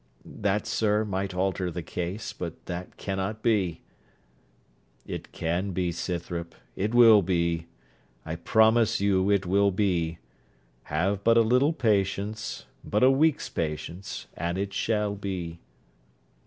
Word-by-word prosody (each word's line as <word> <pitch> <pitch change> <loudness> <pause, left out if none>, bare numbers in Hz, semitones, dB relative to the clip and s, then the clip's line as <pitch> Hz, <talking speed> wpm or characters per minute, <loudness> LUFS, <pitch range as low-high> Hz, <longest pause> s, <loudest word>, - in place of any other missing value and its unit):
'That, 105 +1 -1
sir, 105 0 +1
might 95 -1 -3
alter 95 -1 0
the 85 0 -5
case: 95 +7 -4
but 85 -5 -7
that 90 0 -6
cannot 95 +3 -3
be.' 100 -8 +1 1.2
'It - - -7
can 90 +4 -2
be, 90 -1 0
Scythrop; 85 -1 -4 0.2
it 105 +5 -1
will 115 -3 +8
be: 85 -2 0 0.6
I 80 0 -4
promise 110 +5 +3
you 100 -1 +2
it 100 -2 +2
will 100 +2 +3
be. 90 -4 0 0.7
Have 95 +6 -1
but 115 +1 +5
a - - +7
little 125 +6 +3
patience 105 -4 -1 0.2
but 105 +4 0
a 130 - +7
week's 150 +2 +2
patience; 80 +4 -4
and 85 +1 -2
it 100 0 -3
shall 105 -2 0
be.' 90 -4 -5
95 Hz, 130 wpm, -27 LUFS, 85-105 Hz, 1.2 s, will